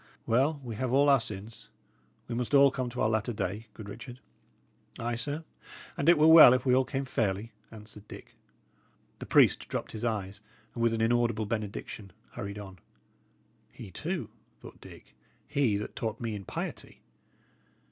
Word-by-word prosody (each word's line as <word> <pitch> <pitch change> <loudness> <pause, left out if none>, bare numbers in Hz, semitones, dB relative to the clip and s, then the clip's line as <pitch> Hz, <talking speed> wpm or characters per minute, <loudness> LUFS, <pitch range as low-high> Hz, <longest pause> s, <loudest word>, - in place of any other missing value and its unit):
"Well, 140 +6 +2
we 115 -4 -6
have 130 0 -2
all 140 +2 +4
our 135 -1 +6
sins. 105 0 -9 0.6
We 120 - -5
must 125 +4 -1
all 140 0 +7
come 130 -2 -3
to 125 +1 -5
our - - +3
latter 110 +2 -1
day, 100 +3 -4
good 110 - -9
Richard." 120 +4 -9 0.8
"Ay, 120 +1 -3
sir; 145 +7 -4 0.5
and 145 - +1
it 170 - +7
were 150 - +4
well 160 -5 +10
if 130 - -2
we 125 - +3
all 130 +1 +3
came 135 +1 -3
fairly," 110 -3 -2 0.2
answered 105 -1 -13
Dick. - - -12 0.9
The - - -8
priest - - +4
dropped - - -4
his 110 0 -7
eyes, 105 -3 -3 0.3
and 120 - -5
with 115 -1 +2
an 110 - -2
inaudible 115 -1 +1
benediction 105 -2 -5 0.2
hurried 100 +1 -6
on. 95 -3 -10 0.9
"He, - - -11
too!" - - -4 0.3
thought - - -13
Dick - - -15 0.3
"he, 135 -8 +1
that 105 - -6
taught 115 -5 -3
me 115 -2 -3
in 100 -2 -7
piety! - - -7
115 Hz, 170 wpm, -29 LUFS, 105-130 Hz, 0.9 s, well